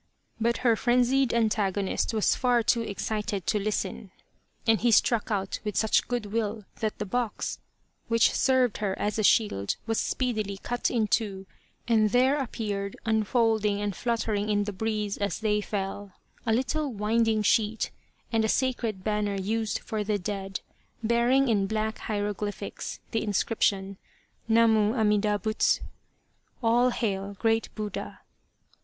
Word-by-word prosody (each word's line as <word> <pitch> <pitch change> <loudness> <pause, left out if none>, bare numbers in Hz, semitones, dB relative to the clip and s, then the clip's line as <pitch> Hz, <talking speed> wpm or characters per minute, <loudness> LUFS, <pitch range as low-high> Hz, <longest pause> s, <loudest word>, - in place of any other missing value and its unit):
But 235 +1 +1
her 230 -2 +5
frenzied 250 +2 +2
antagonist 210 -4 0
was 220 -2 +2
far 245 -2 +2
too 230 +2 +2
excited 210 -1 -3
to 210 - +1
listen, 200 -1 -3 0.6
and 225 -3 +3
he 240 - +3
struck 225 0 +3
out 195 -3 -2
with 210 -2 -3
such 220 - +2
good 245 -3 -2
will 215 -2 -2
that 215 -1 -2
the 210 - -3
box, 235 +2 -2 0.5
which 230 -1 +4
served 260 -4 +2
her 200 -2 -1
as 210 +1 -1
a - - +1
shield, 200 - +2
was 225 -1 0
speedily 215 -6 -1
cut 240 +4 -2
in 230 -3 +1
two, 200 -3 -1 0.4
and 220 -2 +4
there 260 +6 +3
appeared, 205 -6 -3
unfolding 220 -2 +2
and 205 -2 -2
flutter 230 -2 -1
ing 205 +1 -1
in 205 -1 +2
the 205 0 -4
breeze 210 0 -2
as 200 -4 -1
they 210 -1 +1
fell, 200 -1 -4 0.3
a - - +3
little 265 +5 0
winding 220 0 +1
sheet, 220 +1 +1 0.4
and 225 -1 +2
a 220 - +1
sacred 235 -7 0
banner 210 -1 0
used 215 +3 -1
for 215 -1 -3
the 210 0 0
dead, 195 0 -4 0.4
bearing 240 +4 +3
in 205 -4 +2
black 220 +1 -2
hieroglyphics, 205 -1 -4
the 225 - 0
inscription, 200 -2 0 0.3
" - - -41
Namu 225 -1 +4
Amida 210 -2 +2
Butsu! 215 +2 +1 0.4
" - - -37
(All 240 +2 +4
hail, 200 -4 -2
Great 225 +1 +1
Buddha 210 -1 -5
215 Hz, 150 wpm, -27 LUFS, 205-230 Hz, 0.6 s, her